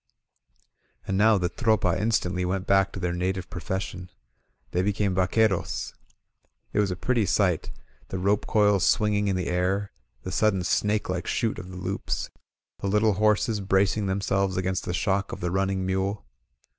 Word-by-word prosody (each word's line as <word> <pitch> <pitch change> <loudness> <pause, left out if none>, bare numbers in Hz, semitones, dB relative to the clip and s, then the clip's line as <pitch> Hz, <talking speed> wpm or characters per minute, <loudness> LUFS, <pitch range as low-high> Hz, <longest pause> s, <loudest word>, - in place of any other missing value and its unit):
And 95 - -2
now 105 +2 +5
the 90 -2 0
Tropa 110 -3 +1
instantly 95 -3 0
went 95 +1 -1
back 95 -1 +3
to - - -6
their 90 -1 -1
native 90 +1 -2
profession 90 +1 -4 0.3
— - - -43
they 90 - +1
became 100 0 0
vaqueros. 95 +1 +1 0.8
It - - +1
was 105 -2 +2
a 90 - -2
pretty 115 +2 0
sight, 90 -3 +1 0.4
the 95 - -4
rope 100 +3 +1
coils 105 -3 +3
swinging 105 -2 +2
in 95 - +1
the 90 -1 -2
air, 95 +3 0 0.3
the 95 - -5
sudden 95 -2 +2
snake 105 +4 +1
like 90 -2 -3
shoot 115 -2 -1
of 90 +1 -9
the 90 - -8
loops, 90 - -3 0.5
the - - -3
little 105 +2 +3
horses 105 +2 +2
bracing 100 +1 +1
themselves 95 0 0
against 95 0 -1
the 90 - -3
shock 100 +3 0
of - - -6
the 90 0 -2
running 95 0 0
mule. 95 -1 -1
95 Hz, 170 wpm, -26 LUFS, 90-105 Hz, 0.8 s, now